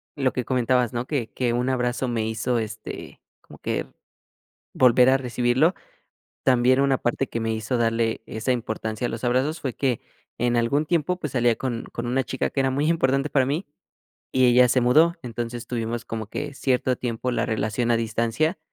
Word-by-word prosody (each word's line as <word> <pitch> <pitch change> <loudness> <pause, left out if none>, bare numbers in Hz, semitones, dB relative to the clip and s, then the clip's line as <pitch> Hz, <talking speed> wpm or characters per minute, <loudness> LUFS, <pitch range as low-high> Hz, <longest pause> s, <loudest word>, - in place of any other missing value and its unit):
lo 135 -3 0
que 125 - -2
comentabas, 125 -1 +1
¿no? 120 +1 -2
Que 125 -7 -2
que 120 -2 -1
un 125 +2 0
abrazo 125 0 0
me 115 -2 -1
hizo, 115 +2 -1
este, 110 0 -7 0.2
como - - -15
que - - -2 0.9
volver 125 0 +5
a 135 - +4
recibirlo. 125 +6 +2 0.7
También, 130 0 +4
una 135 -1 +3
parte 120 +2 -1
que 115 - -4
me 115 0 -1
hizo 110 +3 -2
darle 115 -1 0
esa 110 +4 -2
importancia 110 0 -3
a - - -5
los 115 +2 -6
abrazos 130 +6 +1
fue 130 -3 -2
que 130 -5 0 0.4
en 120 0 +1
algún 140 +6 +1
tiempo, 175 +2 0
pues, 150 -5 -5
salía 120 -2 +3
con 120 -3 -3
con 120 0 -4
una 130 +2 +1
chica 130 +3 -2
que 140 - -3
era 135 -1 +1
muy 145 +3 0
importante 135 -3 +1
para 130 -3 +3
mí 150 +7 -2 0.7
y 130 -1 +4
ella 125 0 +6
se 130 +1 +3
mudó. 155 +8 +4
Entonces, 120 0 -5
tuvimos 115 -1 -3
como 110 -2 -5
que 145 +4 -4
cierto 130 -2 +1
tiempo 120 +1 -3
la 120 0 0
relación 110 +1 -1
a - - +4
distancia, 115 - 0
125 Hz, 190 wpm, -24 LUFS, 115-130 Hz, 0.9 s, ella